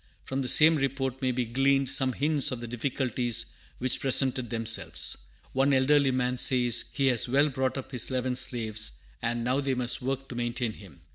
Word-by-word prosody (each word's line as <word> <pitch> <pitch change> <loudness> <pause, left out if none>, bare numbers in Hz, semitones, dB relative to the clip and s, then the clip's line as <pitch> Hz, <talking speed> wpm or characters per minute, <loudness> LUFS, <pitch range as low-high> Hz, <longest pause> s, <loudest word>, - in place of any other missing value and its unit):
From 135 +1 -3
the 130 - -3
same 155 +4 +6
report 135 -1 -2
may 130 -1 +1
be 125 0 -1
gleaned 135 +3 +1
some 130 0 0
hints 145 0 +1
of 125 - -4
the 120 - -7
difficulties 120 -1 0 0.3
which 130 0 -1
presented 130 -2 +1
themselves. 115 -1 -1 0.4
One 135 +2 +2
elderly 140 +1 +3
man 125 -1 -1
says 120 -3 +2
he 140 - -1
has 120 -1 +2
well 140 +4 +3
brought 130 0 -2
up 135 - -7
his 125 -4 +1
eleven 130 -1 -1
slaves, 110 - +1 0.3
and 120 +1 -2
"now 125 +3 +1
they 135 -1 -1
must 125 +1 -2
work 135 +1 -3
to - - -6
maintain 120 -1 -2
him." 95 -10 -15
130 Hz, 190 wpm, -28 LUFS, 120-135 Hz, 0.4 s, same